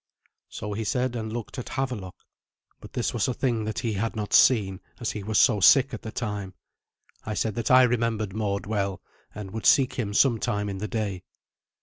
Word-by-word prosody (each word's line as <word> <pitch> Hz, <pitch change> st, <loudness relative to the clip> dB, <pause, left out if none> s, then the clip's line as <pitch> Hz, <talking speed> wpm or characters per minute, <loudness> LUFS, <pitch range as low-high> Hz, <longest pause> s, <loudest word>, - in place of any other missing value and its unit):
So 105 Hz, 0 st, -5 dB
he 110 Hz, +2 st, -3 dB
said, 125 Hz, +3 st, -1 dB
and 110 Hz, -2 st, -4 dB
looked 120 Hz, +2 st, -6 dB
at 125 Hz, -, -7 dB
Havelok. 125 Hz, -9 st, -4 dB, 0.6 s
But -, -, -13 dB
this 120 Hz, -, -1 dB
was 120 Hz, +1 st, 0 dB
a 125 Hz, -, -2 dB
thing 115 Hz, -5 st, -1 dB
that 110 Hz, -1 st, -4 dB
he 115 Hz, -2 st, -1 dB
had 115 Hz, +4 st, -2 dB
not 105 Hz, -1 st, -4 dB
seen, 100 Hz, -7 st, +4 dB, 0.2 s
as 120 Hz, -, -2 dB
he 105 Hz, -, -5 dB
was 110 Hz, +2 st, -1 dB
so 105 Hz, -1 st, +5 dB
sick 135 Hz, +7 st, +6 dB
at 115 Hz, -, -5 dB
the 110 Hz, -, -7 dB
time. 105 Hz, -5 st, -4 dB, 0.7 s
I 110 Hz, -, -4 dB
said 110 Hz, 0 st, -1 dB
that 115 Hz, +1 st, -3 dB
I 130 Hz, 0 st, +7 dB
remembered 115 Hz, -4 st, 0 dB
Mord 100 Hz, -2 st, -2 dB
well, 100 Hz, -2 st, -2 dB, 0.4 s
and 100 Hz, -2 st, -7 dB
would 110 Hz, +1 st, -2 dB
seek 135 Hz, -2 st, +5 dB
him 105 Hz, -5 st, -3 dB
some 120 Hz, -3 st, +4 dB
time 105 Hz, 0 st, -1 dB
in 95 Hz, -1 st, -5 dB
the 105 Hz, -, -3 dB
day. 100 Hz, -3 st, -3 dB
110 Hz, 210 wpm, -26 LUFS, 100-120 Hz, 0.7 s, I